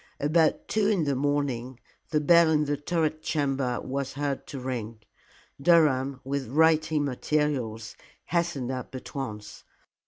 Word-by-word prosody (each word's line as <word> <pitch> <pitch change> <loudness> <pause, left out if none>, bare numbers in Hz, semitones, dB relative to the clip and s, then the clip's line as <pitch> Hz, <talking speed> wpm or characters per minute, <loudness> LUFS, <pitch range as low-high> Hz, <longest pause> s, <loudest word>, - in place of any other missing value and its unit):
About 155 +2 +2
two 215 -2 +1
in 200 -6 +2
the 140 -2 0
morning 130 -3 -1 0.3
the 155 - +2
bell 170 +2 +5
in 150 -1 +2
the 145 0 0
turret 155 +1 -1
chamber 135 -5 -1
was 135 0 -4
heard 140 -1 -3
to 140 - -6
ring. 115 -4 -5 0.6
Durham, 140 -5 +3
with 140 0 -3
writing 155 +2 +3
materials, 130 -5 -1 0.3
hastened 170 -7 -1
up 130 0 -6
at 130 - -8
once. 105 -7 -6
140 Hz, 135 wpm, -27 LUFS, 130-155 Hz, 0.6 s, bell